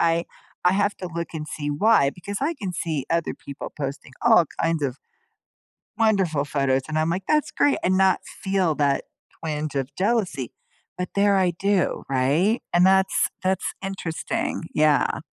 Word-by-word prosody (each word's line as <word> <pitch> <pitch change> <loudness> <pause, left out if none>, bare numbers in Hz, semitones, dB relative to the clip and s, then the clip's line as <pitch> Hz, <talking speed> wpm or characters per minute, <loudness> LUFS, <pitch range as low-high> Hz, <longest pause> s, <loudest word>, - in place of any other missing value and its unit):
I 170 0 +2 0.4
I 180 - +5
have 205 +1 +1
to 180 - -5
look 170 0 -3
and 155 -1 -4
see 145 -1 -4
why 145 -3 +4
because 200 +5 -6
I 315 +4 0
can 195 -9 -5
see 160 -5 -2
other 170 0 0
people 140 -1 -8
posting 140 -2 -5
all 225 -7 +6 0.2
kinds 165 -2 +1
of 135 -1 -1 1.0
wonderful 190 -10 +2
photos, 135 -2 +1
and 155 - -3
I'm 160 +1 +1
like, 185 +2 -2
"That's 305 -1 +2
great," 290 - +2
and 185 +1 +2
not 190 -1 +4
feel 190 -5 -1
that 140 -2 +1 0.4
twinge 155 -2 -3
of 135 0 -2
jealousy. 190 - 0 0.4
But 180 0 -3
there 200 0 +4
I 185 -2 +3
do, 195 +2 0
right? 145 - +2
And 175 +2 +5
that's 190 0 +3
that's 185 0 0
interesting, 185 -3 -3
yeah. 150 -3 +2
170 Hz, 165 wpm, -24 LUFS, 150-195 Hz, 1.0 s, all